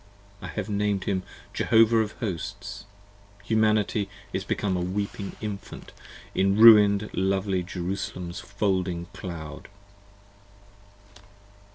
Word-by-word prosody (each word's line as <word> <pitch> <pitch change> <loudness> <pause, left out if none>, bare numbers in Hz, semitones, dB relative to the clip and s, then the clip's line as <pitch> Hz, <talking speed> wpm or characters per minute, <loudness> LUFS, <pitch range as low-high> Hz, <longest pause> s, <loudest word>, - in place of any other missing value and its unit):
I - - -6
have 105 -1 -4
named 105 -2 0
him 95 -2 -1 0.3
Jehovah 115 0 +4
of 110 -1 -1
Hosts. 100 -1 -5 0.6
Humanity 110 -1 +1 0.2
is - - -2
become 100 -3 -1
A 90 - -1
weeping 100 +2 -3
Infant 105 -2 -7 0.4
in 95 +1 +2
ruin'd 105 -2 +7
lovely 95 0 0
Jerusalem's 90 -1 -4
folding 95 -4 -1
Cloud! 80 -4 -7
100 Hz, 95 wpm, -26 LUFS, 95-105 Hz, 0.6 s, ruin'd